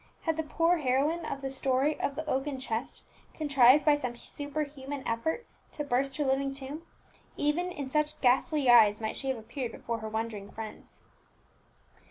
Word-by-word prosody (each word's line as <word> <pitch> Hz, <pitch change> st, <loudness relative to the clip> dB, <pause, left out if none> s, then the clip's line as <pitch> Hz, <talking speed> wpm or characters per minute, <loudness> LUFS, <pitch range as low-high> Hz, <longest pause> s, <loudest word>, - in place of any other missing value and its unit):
Had 325 Hz, -1 st, +1 dB
the 320 Hz, -, 0 dB
poor 330 Hz, +3 st, +2 dB
heroine 300 Hz, +4 st, +1 dB
of 275 Hz, -, -4 dB
the 270 Hz, -, -3 dB
story 270 Hz, +2 st, +1 dB
of 280 Hz, -, -1 dB
the 315 Hz, +1 st, -5 dB
oaken 270 Hz, -1 st, -1 dB
chest 235 Hz, -2 st, -4 dB, 0.3 s
contrived 280 Hz, -2 st, +5 dB
by 300 Hz, -, +6 dB
some 255 Hz, -5 st, -2 dB
superhuman 285 Hz, 0 st, -5 dB
effort 320 Hz, -, -1 dB, 0.3 s
to 295 Hz, -, -3 dB
burst 270 Hz, 0 st, 0 dB
her 295 Hz, -, 0 dB
living 270 Hz, +1 st, +1 dB
tomb, 275 Hz, +3 st, -6 dB, 0.6 s
even 340 Hz, +5 st, 0 dB
in 285 Hz, -6 st, -5 dB
such 300 Hz, +2 st, 0 dB
ghastly 270 Hz, +4 st, +3 dB
guise 225 Hz, -4 st, +7 dB
might 220 Hz, -1 st, -3 dB
she 270 Hz, -, -3 dB
have 260 Hz, -, 0 dB
appeared 235 Hz, +2 st, -5 dB
before 230 Hz, 0 st, -4 dB
her 220 Hz, 0 st, -5 dB
wondering 220 Hz, -2 st, -4 dB
friends. 220 Hz, -1 st, -9 dB
275 Hz, 170 wpm, -30 LUFS, 245-300 Hz, 0.6 s, guise